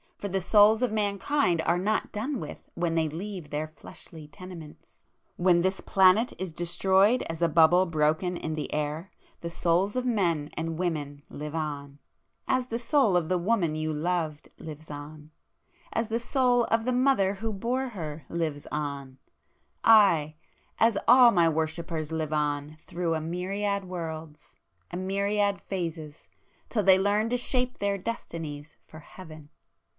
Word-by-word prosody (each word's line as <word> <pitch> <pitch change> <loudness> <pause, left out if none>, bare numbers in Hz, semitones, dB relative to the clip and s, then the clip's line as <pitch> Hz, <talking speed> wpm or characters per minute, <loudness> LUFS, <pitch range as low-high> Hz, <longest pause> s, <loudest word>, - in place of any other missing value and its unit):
—for 205 - -5
the 195 0 -1
souls 215 +4 +5
of 245 - +1
mankind 205 - +1
are 170 +1 +2
not 215 +4 -1
done 245 +5 -3
with 150 - -9
when 170 -1 -1
they 160 -1 +1
leave 175 0 -6
their 150 +1 -3
fleshly 155 0 -12
tenements! 165 -1 -12 0.3
When 175 -1 +3
this 190 +2 -1
planet 195 +5 +4
is 185 -3 -5
destroyed 190 +7 +2
as 165 0 -6
a 170 - +4
bubble 170 +4 +5
broken 160 +3 0
in 160 - -4
the 155 -1 -4
air, 150 +4 -3 0.3
the 170 - -4
souls 175 +5 0
of 255 0 -1
men 170 -11 0
and 165 0 -4
women 150 -5 -3
live 150 +1 -7
on,—as 150 - -5
the 230 - -2
soul 240 - +2
of 170 -3 -1
the 185 - +2
woman 175 -4 +1
you 155 0 -2
loved 160 -1 -2
lives 155 -1 -9
on,—as 155 +9 -8
the 230 +1 -1
soul 245 -1 +2
of 225 0 0
the 255 - +1
mother 250 -7 +3
who 225 +3 -4
bore 245 +6 -2
her, 160 -8 -7
lives 160 -4 -3
on,—aye!—as 155 - 0
all 245 0 +8
My 170 -4 +4
worshippers 160 0 -3
live 155 -1 -2
on 150 0 -2
through 170 -2 -1
a 160 - -2
myriad 195 +4 -2
worlds, 160 -4 -7 0.4
a 175 - -4
myriad 200 +2 0
phases, 165 -5 -6 0.4
till 215 -4 0
they 190 0 +6
learn 205 +3 +1
to 245 - +1
shape 250 0 0
their 200 0 -1
destinies 160 -8 -6
for 155 - -12
Heaven! 155 -2 -13
175 Hz, 150 wpm, -27 LUFS, 155-205 Hz, 0.4 s, all